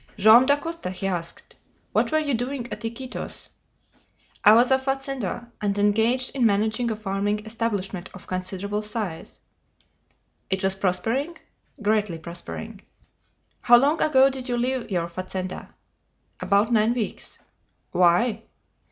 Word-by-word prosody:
"Joam 220 +5 +7
Dacosta," 290 - -1
he 185 +1 -5
asked, 175 -3 -4 0.4
"what - - +1
were 310 - +3
you 300 -3 0
doing 245 +2 -2
at 215 - -8
Iquitos?" 235 +3 -6 0.9
"I 210 +1 +8
was 245 +3 +4
a 265 - +5
fazender, 270 -4 -3
and 205 -1 0
engaged 225 +6 +2
in 260 - +1
managing 220 +2 +2
a 220 - -1
farming 205 +1 -2
establishment 205 -5 -3
of - - -12
considerable 190 +3 -3
size." 210 -6 -5 1.1
"It 190 0 0
was 190 0 +3
prospering?" 225 - -1 0.5
"Greatly 210 -4 +1
prospering." 170 +2 -8 0.8
"How 240 - +7
long 285 +6 +2
ago 270 -2 +5
did 260 -1 -5
you 245 - 0
leave 250 0 -1
your 175 -4 -1
fazenda?" 185 +1 -6 0.6
"About 200 +4 +2
nine 225 +2 +3
weeks." 225 -4 -4 0.5
"Why?" 180 +6 +3
220 Hz, 130 wpm, -24 LUFS, 195-250 Hz, 1.1 s, I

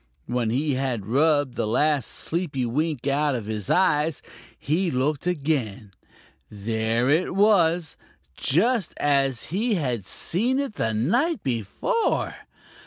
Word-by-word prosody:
When 120 -2 -1
he 140 +5 0
had 130 -6 -2
rubbed 145 +3 +2
the 110 - -2
last 145 +4 +1
sleepy 155 -7 -3
wink 145 +2 -2
out 145 0 +1
of 115 -4 -4
his 105 -2 -4
eyes, 160 -4 +2 0.3
he 170 +6 0
looked 145 +3 -1
again. 135 - -2 0.6
There 110 +3 -1
it 160 +6 +1
was, 175 -6 +3 0.4
just 210 - +1
as 135 -4 +1
he 220 +3 +1
had 125 - -1
seen 235 +10 0
it 275 -5 -2
the 110 - -1
night 235 - +1
before! 125 - -1
145 Hz, 125 wpm, -24 LUFS, 120-175 Hz, 0.6 s, was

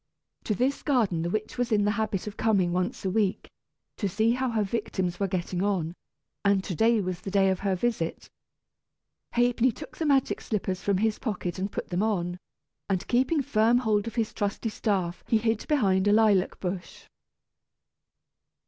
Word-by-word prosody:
To 215 - 0
this 265 +6 0
garden 225 - +1
the 170 - -1
witch 215 +5 -3
was 245 -1 0
in 205 -2 +3
the 205 - +3
habit 210 -3 -2
of 210 -1 -6
coming 195 -7 +2
once 180 +2 -2
a - - +2
week, 200 -2 0 0.5
to 200 - -1
see 220 +5 +2
how 255 +1 0
her 220 -2 +1
victims 190 -4 -2
were 200 - +1
getting 180 0 -2
on, 185 -5 0 0.5
and 200 -1 +3
to 190 - -4
day 225 +6 +3
was 180 -2 -4
the 195 - -5
day 195 0 +3
of 190 - -1
her 195 -1 0
visit. 185 -5 -2 1.1
Ha'penny 245 +1 +3
took 300 - -11
the 320 - -1
magic 275 -2 +2
slippers 190 -3 -2
from 200 -1 +1
his 220 +2 0
pocket 185 -6 -3
and 195 +2 -2
put - - -5
them 180 +1 0
on; 180 -5 -1 0.5
and 190 -2 -1
keeping 265 +5 +2
firm 235 -2 +3
hold 220 -3 +1
of 230 - -6
his 225 -2 -1
trusty 205 +2 -2
staff 190 -5 -1
he 225 - +3
hid 225 0 -1
behind 200 -10 +2
a - - +5
lilac 210 -4 +3
bush. 180 -1 -5
205 Hz, 185 wpm, -27 LUFS, 185-230 Hz, 1.1 s, a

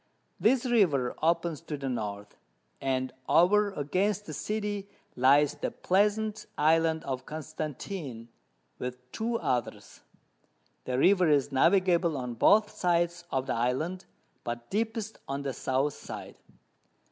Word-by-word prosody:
This 250 +3 +3
River 175 - +2
opens 165 0 +1
to 155 -3 -5
the 135 -1 -4
North, 105 -5 -4 0.5
and 130 -1 -1 0.2
over 185 +8 +5
against 190 +7 0
the - - -7
City 205 -2 -3 0.3
lies 140 +3 +5
the - - -3
pleasant 210 +3 0
Island 160 +1 +3
of 130 -1 -4
Constantine, 155 - -6 0.5
with 125 0 -4
two 230 +1 -1
others; 125 - -3 0.8
the 125 0 -1
River 180 +3 +4
is 145 -1 +2
navigable 170 +2 +3
on 125 -2 -4
both 210 - +4
sides 175 0 0
of 130 -1 0
the - - -1
Island, 130 +10 -1 0.4
but 120 0 -6
deepest 220 0 -2
on 140 +1 -3
the 135 -1 -2
South 135 +4 0
side. - - -9
160 Hz, 125 wpm, -29 LUFS, 130-200 Hz, 0.8 s, over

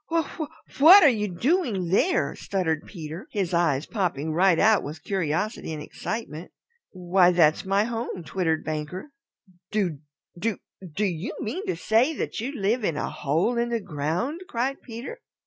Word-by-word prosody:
"Wha 330 -2 +1
wha 310 - -2 0.3
what 360 +7 +10
were 300 - +8
you 210 -4 0
doing 205 - 0
there?" 345 - +2
stuttered 165 -6 -2
Peter, 165 0 -8
his 190 -4 -2
eyes 160 -4 +2
popping 160 - -2
right 180 +1 +4
out 215 +2 +4
with 150 +3 -8
curiosity 190 +1 -2
and 150 -1 -5
excitement. 180 -4 -6 0.4
"Why, 180 0 +3
that's 165 -3 +3
my 195 +2 +2
home," 230 -5 -4
twittered 160 0 -1
Banker. 155 - -5 0.6
"Do 185 -9 -1 0.4
do 210 +4 -2 0.4
do 210 - +1
you 175 0 -3
mean 360 - -4
to 375 - 0
say 240 +8 +2
that - - -3
you 245 +5 -3
live 225 -2 0
in 165 -7 0
a - - -2
hole 165 - 0
in 235 0 0
the 235 -1 0
ground?" 180 - -3
cried 260 +4 -2
Peter. 245 - -8
195 Hz, 165 wpm, -25 LUFS, 165-235 Hz, 0.6 s, what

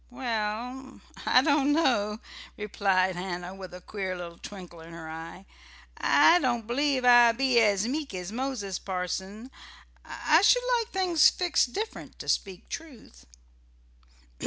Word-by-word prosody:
"Well, 245 +2 -4 0.3
I - - +5
don't 290 -2 +2
know," 220 -9 +1 0.4
replied 195 -3 0
Hannah, 180 0 -5
with 190 -1 -10
a 180 0 -10
queer 190 -1 -5
little 170 -1 -9
twinkle 180 -4 -10
in 165 +1 -12
her 165 -1 -9
eye. 165 +4 -9 0.5
"I 345 +2 +5
don't 240 -6 -1
believe 260 +2 0
I 240 -1 +7
be 255 0 +2
as 210 -1 +2
meek 290 +3 -3
as 180 +1 -6
Moses, 230 -6 -4
parson. 190 +5 -5 0.5
I 315 +2 +2
should - - +4 0.2
like 455 - -3
things 365 -6 +4
fixed 345 -8 0
different, 435 +2 -6
to - - -9
speak 190 -3 -2
truth." 230 - -10
220 Hz, 135 wpm, -27 LUFS, 185-270 Hz, 0.5 s, I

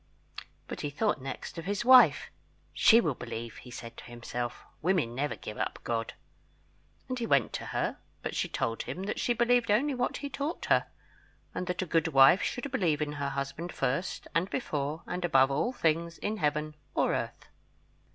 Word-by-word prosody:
But - - -6
he 145 - -2
thought 160 +1 0
next 135 +5 -6
of 165 - -7
his 205 +4 -2
wife. 255 0 +7 0.4
"She 230 - +7
will 155 -10 +1
believe," 115 -1 -6
he 125 - -11
said 115 -1 -8
to - - -9
himself; 120 0 -5 0.2
"women 165 -9 +1
never 140 +4 -1
give 105 - -8
up - - -2
God." 115 -1 -2 0.9
And 255 -1 -3
he 230 - -2
went 140 - +3
to - - -4
her; - - -1 0.3
but - - -3
she - - -1
told 115 0 -1
him 185 - -5
that 210 - -3
she 240 - +2
believed 240 0 +2
only 270 +8 +3
what 250 -1 -1
he 285 - -4
taught 290 +4 -3
her, - - +4 0.7
and 180 - -3
that 180 +1 -1
a - - -4
good 165 -1 +2
wife 135 +7 +7
should 255 +2 -3
believe 170 - +1
in 150 -1 -1
her 145 -1 -2
husband 140 +5 -4
first 155 +9 -2
and 175 +3 +1
before 150 - -2
and 180 - -4
above 135 -5 +4
all 150 - +1
things 170 -6 0
in 215 +1 -2
Heaven 150 -2 0 0.2
or - - +2
earth. - - -4
165 Hz, 190 wpm, -30 LUFS, 135-210 Hz, 0.9 s, wife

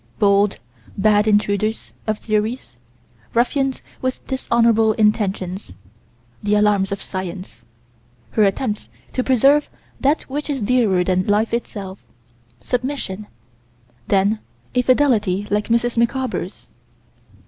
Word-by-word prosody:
Bold, 200 0 +3 0.4
bad 210 +1 +3
intruders 210 +1 +1 0.2
of 215 -1 0
theories; 215 - -2 0.6
ruffians 265 +3 +1 0.2
with 255 0 -3
dishonorable 230 -4 +2
intentions 200 - 0 0.7
the 210 0 +1
alarms 205 -2 +2
of 200 - -4
Science; 185 0 -6 0.7
her 215 - +3
attempts 210 +2 -1 0.2
to 255 - 0
preserve 275 +4 +4 0.3
that 285 +4 +2
which 290 +3 -5
is 280 -2 -1
dearer 205 -6 +3
than 185 0 0
life 210 +2 +2
itself 200 -5 -4 0.6
submission 240 - -3 0.8
then 200 +2 +2 0.3
a 250 - +3
fidelity 230 -7 +2
like 210 0 +1
Mrs. 235 +1 +1
Micawber's. 255 +3 -2
215 Hz, 105 wpm, -20 LUFS, 200-250 Hz, 0.8 s, preserve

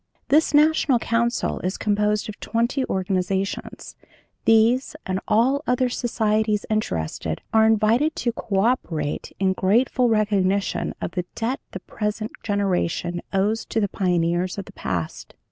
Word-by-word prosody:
"'This 310 +3 +4
National 300 -3 +4
Council 235 +1 0
is 185 +2 -3
composed 210 0 0
of 215 - -8
twenty 235 +4 0
organizations; 190 +1 -2 0.5
these 225 +4 +3
and 185 0 -1
all 250 +6 +3
other 250 0 +2
societies 220 -3 0
interested 80 - -2
are 220 0 +5
invited 225 +8 +3
to 240 - -1
co 205 -4 -1
operate 165 - -1
in 190 -1 +2
grateful 235 +6 +2
recognition 200 -3 +1
of - - -3
the 180 -1 -3
debt 240 +4 -2
the 190 - -5
present 210 +2 -3
generation 180 -4 -1
owes 210 +3 +1
to 225 - -2
the 205 -2 0
pioneers 175 -1 0
of 200 - -5
the - - -12
past. 85 -3 -4
210 Hz, 135 wpm, -23 LUFS, 190-235 Hz, 0.5 s, are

